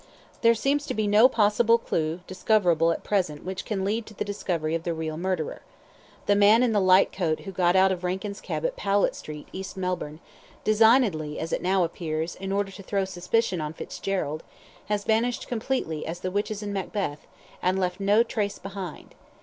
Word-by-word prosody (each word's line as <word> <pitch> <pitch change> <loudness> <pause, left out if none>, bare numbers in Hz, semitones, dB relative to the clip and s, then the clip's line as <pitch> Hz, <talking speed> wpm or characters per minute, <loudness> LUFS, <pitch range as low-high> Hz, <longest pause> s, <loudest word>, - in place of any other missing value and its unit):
There 230 0 +5
seems 285 +6 0
to - - -3
be 215 0 0
no 210 +5 +6
possible 230 0 +4
clue 165 -6 -2
discoverable 180 -4 +2
at - - -3
present 180 -8 -1
which 190 +1 -4
can 195 -3 -2
lead 215 +3 -1
to 215 - -12
the - - -3
discovery 170 -6 -2
of 165 - 0
the 170 0 -2
real 160 -1 -3
murderer. 175 -2 -2 0.6
The 205 - +3
man 210 +4 +6
in 245 - +2
the 210 -2 +2
light 185 +1 +5
coat 165 -5 -1
who 195 - -7
got 180 -1 +2
out 190 0 +5
of 180 -1 -3
Rankin's 190 +3 -3
cab - - -3
at - - -1
Powlett 200 - +1
Street, 150 -1 -8
East 190 0 -6
Melbourne 180 -5 -3 0.4
(designedly, 215 - +3
as 165 +1 -4
it - - 0
now 185 0 +2
appears, 165 -1 -3
in 195 0 -6
order 200 0 0
to 195 - -10
throw 195 0 -1
suspicion 185 0 0
on 150 0 -4
Fitzgerald), 160 -3 -3 0.5
has 205 -1 -1
vanished 230 +3 +1
as - - -7
completely 225 - -2
as 170 +2 -5
the 185 - -2
witches 205 +1 -2
in 205 -1 -4
Macbeth, 190 -6 -3 0.3
and 185 +1 +1
left 180 -1 -1
no 205 +3 +4
trace 210 -3 -2
behind. 195 -4 -8
190 Hz, 195 wpm, -26 LUFS, 175-210 Hz, 0.6 s, no